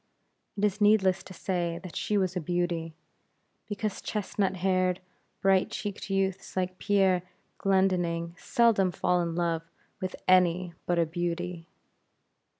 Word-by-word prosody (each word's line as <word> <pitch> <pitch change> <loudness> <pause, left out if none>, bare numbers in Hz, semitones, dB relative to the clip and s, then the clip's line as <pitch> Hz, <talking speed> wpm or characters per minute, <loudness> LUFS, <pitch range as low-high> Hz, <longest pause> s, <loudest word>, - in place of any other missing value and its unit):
It 205 - +2
is 210 +1 -1
needless 200 -3 +4
to 185 - -11
say 170 -2 -2
that 185 - -9
she 210 - 0
was 190 -2 0
a 180 - -1
beauty; 170 -1 -1 0.7
because 210 -1 -3
chestnut 200 -2 -1
haired, 185 0 +1 0.4
bright 195 -1 +3
cheeked 205 -1 -5
youths 195 -1 -1
like 185 0 -1
Pierre 195 -3 +3 0.4
Glendinning, 175 -3 +1
seldom 215 -1 +3
fall 180 0 +1
in 170 -1 -2
love 170 -1 0 0.4
with 185 -1 -3
any 180 -1 +4
but 175 - +2
a 170 - +4
beauty. 175 +1 -3
185 Hz, 135 wpm, -28 LUFS, 175-195 Hz, 0.7 s, needless